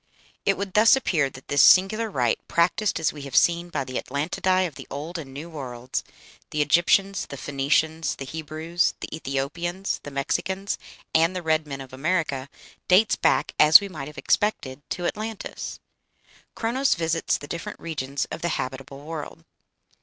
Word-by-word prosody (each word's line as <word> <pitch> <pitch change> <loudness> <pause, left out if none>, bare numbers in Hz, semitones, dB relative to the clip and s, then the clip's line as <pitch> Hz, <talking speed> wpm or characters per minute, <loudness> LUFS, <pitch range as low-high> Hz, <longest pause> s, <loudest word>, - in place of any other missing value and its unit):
It 195 - +3
would 195 -1 -4
thus 220 +4 +7
appear 160 - +1
that 130 0 -14
this 145 - +3
singular 215 +4 +5
rite, 125 - +1
practised 180 +4 +1
as 160 - +1
we 150 - -9
have 140 -2 -7
seen 170 0 +3
by 170 - -2
the 130 -1 -4
Atlantidæ 180 +6 0
of 165 - -5
the - - -10
Old 155 +5 -5
and 140 -4 -8
New 145 +5 -7
Worlds, 130 -6 -5 0.5
the 150 - -3
Egyptians, 185 +6 +3
the 140 - -8
Phoenicians, 145 +4 0
the 135 - -7
Hebrews, 160 +3 -1
the - - -5
Ethiopians, 170 +7 -3
the - - -8
Mexicans, 175 +8 -2 0.3
and 165 +3 +3
the 180 - -3
red 155 -1 +1
men 135 -1 -6
of 130 -1 -11
America, 140 -2 -1 0.4
dates 195 +4 +5
back, - - +1
as 155 +1 +10
we 200 - -6
might 150 -6 -7
have 150 - -11
expected, 145 -10 0
to 175 - -3
Atlantis. 215 +3 -4 0.8
"Chronos 255 +4 +1
visits 165 -1 0
the 145 - -10
different 170 +1 -6
regions 140 -4 -3
of - - -5
the 170 - 0
habitable 135 +2 -6
world." 155 - -7
160 Hz, 170 wpm, -25 LUFS, 140-185 Hz, 0.8 s, as